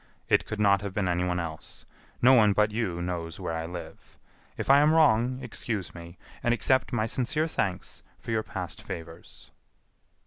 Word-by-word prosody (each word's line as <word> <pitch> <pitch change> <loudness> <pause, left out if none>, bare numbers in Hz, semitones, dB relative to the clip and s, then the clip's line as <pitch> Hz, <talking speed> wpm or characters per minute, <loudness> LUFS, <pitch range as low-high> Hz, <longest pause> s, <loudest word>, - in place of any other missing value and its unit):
It - - +3
could 105 - -5
not 100 -2 +4
have 100 -2 -6
been 100 -3 0
anyone 90 0 0
else. 80 -2 -7 0.4
No 130 +2 +8
one 105 -5 +5
but 105 +1 +2
you 95 -6 -2
knows 85 -2 -4
where 85 - -3
I 80 0 -3
live. 85 -2 -10 0.4
If - - -4
I 140 +1 +7
am 150 +2 +4
wrong, 125 -5 +4
excuse 105 -7 -4
me, 85 0 -11 0.2
and 120 0 +2
accept 130 +4 +1
my 110 -3 0
sincere 130 +7 0
thanks 90 - -3 0.2
for - - -7
your 110 -1 +1
past 95 -6 -6
favors...." 80 0 -10
100 Hz, 175 wpm, -27 LUFS, 85-120 Hz, 0.4 s, No